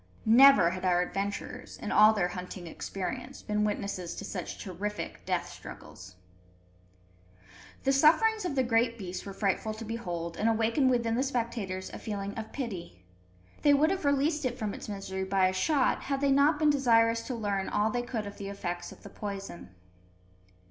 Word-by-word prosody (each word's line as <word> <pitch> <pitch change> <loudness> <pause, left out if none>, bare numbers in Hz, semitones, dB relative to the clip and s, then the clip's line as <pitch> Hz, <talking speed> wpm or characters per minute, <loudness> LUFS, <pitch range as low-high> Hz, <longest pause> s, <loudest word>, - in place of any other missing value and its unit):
Never 230 -6 +7
had 185 0 -6
our 180 -1 +3
adventurers, 200 +7 -5
in 210 - -5
all 215 +1 +7
their 195 -5 0
hunting 180 0 -7
experience, 245 +10 -6
been 210 0 0
witnesses 200 -4 -3
to - - -6
such 180 -4 -5
terrific 205 +3 -5
death - - 0
struggles. 95 0 -11 1.7
The 270 - +3
sufferings 335 +11 +4
of 355 -6 -2
the 260 - +3
great 230 0 +1
beast 185 -2 -6
were - - -5
frightful 205 +2 -1
to 225 +1 -7
behold, 175 -7 -4
and 220 - +2
awakened 230 +4 +2
within 235 -2 +1
the 240 - +1
spectators 230 -8 -3
a - - -8
feeling 200 -2 -4
of 220 -1 -6
pity. 180 - -6 0.6
They 290 -1 +5
would 310 +5 +3
have 385 -2 -2
released 290 +2 +1
it 250 -1 -2
from 215 -4 -3
its - - -8
misery 195 -2 -4
by 190 -1 +2
a - - -3
shot, 270 +8 +1
had 275 -1 -2
they 280 0 +2
not 285 +3 +4
been 300 -1 +4
desirous 230 -4 +3
to 255 - -3
learn 200 -4 -2
all 210 +1 +1
they 245 - -1
could 235 -3 -4
of 200 - -9
the 200 -1 -5
effects 175 -3 -5
of - - -15
the - - -9
poison. 195 - -7
220 Hz, 180 wpm, -29 LUFS, 195-255 Hz, 1.7 s, Never